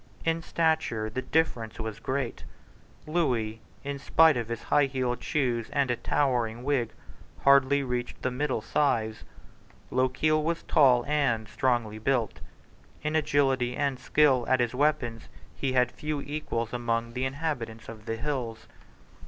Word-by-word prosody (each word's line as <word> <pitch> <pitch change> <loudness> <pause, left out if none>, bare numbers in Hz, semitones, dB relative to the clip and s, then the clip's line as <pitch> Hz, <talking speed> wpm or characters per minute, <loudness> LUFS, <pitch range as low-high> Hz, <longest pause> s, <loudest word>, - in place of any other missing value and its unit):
In 165 0 +1
stature 160 -11 0
the 130 - -2
difference 125 -9 -1
was 110 -1 -5
great. 130 -2 -3 0.6
Lewis, 125 -10 0 0.3
in 140 0 -4
spite 160 +2 +5
of 120 -2 -2
highheeled 125 +1 0
shoes 125 -7 -1
and 140 -3 +1
a - - +1
towering 120 -4 0
wig, 130 -5 0 0.5
hardly 140 0 +5
reached 125 -1 -4
the 130 - 0
middle 130 -2 -1
size. 110 -7 0 0.7
Lochiel 130 +5 +2
was 170 +1 -1
tall 125 -4 +4
and 135 -7 +1
strongly 120 -3 0
built. 120 -1 0 0.6
In 155 +1 -1
agility 135 -5 +2
and 140 -3 0
skill 130 -1 +3
at 130 - +4
his 120 -1 +1
weapons 125 -5 0 0.3
he 135 -2 -1
had 125 -1 +3
few 150 -1 -3
equals 140 -6 -3
among 115 -1 -1
the 130 +1 -1
inhabitants 130 -6 -4
of 110 -1 -10
the 115 - -1
hills. 120 -3 -4
130 Hz, 135 wpm, -28 LUFS, 115-145 Hz, 0.7 s, spite